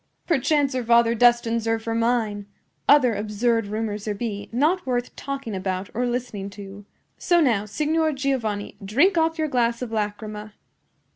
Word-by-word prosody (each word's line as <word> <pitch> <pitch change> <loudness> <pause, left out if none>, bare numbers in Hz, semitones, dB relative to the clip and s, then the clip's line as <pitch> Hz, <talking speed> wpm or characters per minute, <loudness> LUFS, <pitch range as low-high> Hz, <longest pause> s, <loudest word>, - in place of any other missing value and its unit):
Perchance 290 -3 +1
her 255 -1 -1
father 235 0 +4
destines 235 -1 +3
her 225 0 +1
for 225 0 -4
mine! 225 -3 0 0.4
Other 265 -5 +6
absurd 215 +2 0
rumors 215 -1 -3
there 210 -1 -2
be, 205 -2 -5
not 310 +10 +1
worth 245 -2 -2
talking 275 -5 -5
about 185 0 -3
or 245 +2 -1
listening 240 -5 -3
to. 200 0 -10 0.3
So 345 -1 +3
now, 230 -10 +2
Signor 310 +8 0
Giovanni, 250 -7 -2
drink 280 - +3
off 325 0 +1
your 315 -1 0
glass 240 -3 0
of 235 - -6
lachryma." 210 0 -4
230 Hz, 155 wpm, -24 LUFS, 210-265 Hz, 0.4 s, Other